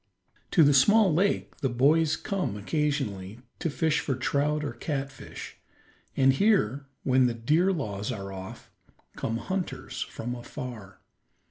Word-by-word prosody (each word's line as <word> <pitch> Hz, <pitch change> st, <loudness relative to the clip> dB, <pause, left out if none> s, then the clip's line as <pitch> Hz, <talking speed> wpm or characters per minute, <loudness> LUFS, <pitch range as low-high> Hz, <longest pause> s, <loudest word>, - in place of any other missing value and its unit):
To 165 Hz, -, +5 dB
the 145 Hz, 0 st, +6 dB
small 195 Hz, +8 st, +5 dB
lake 195 Hz, +6 st, 0 dB
the 135 Hz, -, -1 dB
boys 145 Hz, +6 st, +3 dB
come 190 Hz, -, -2 dB
occasionally 115 Hz, -, -2 dB, 0.2 s
to 165 Hz, -, -1 dB
fish 155 Hz, +1 st, +1 dB
for 135 Hz, -, -1 dB
trout 145 Hz, +4 st, 0 dB
or -, -, -3 dB
catfish, 135 Hz, -3 st, -6 dB, 0.6 s
and 135 Hz, 0 st, +5 dB
here, 140 Hz, -, +2 dB, 0.2 s
when 130 Hz, -1 st, +4 dB
the 120 Hz, -, -2 dB
deer 155 Hz, +11 st, +2 dB
laws 105 Hz, -, -3 dB
are 100 Hz, -4 st, -6 dB
off, 95 Hz, +5 st, -9 dB, 0.4 s
come 115 Hz, -, -2 dB
hunters 175 Hz, -6 st, -4 dB
from 120 Hz, -3 st, -4 dB
afar. 120 Hz, -5 st, -8 dB
135 Hz, 135 wpm, -27 LUFS, 115-155 Hz, 0.6 s, the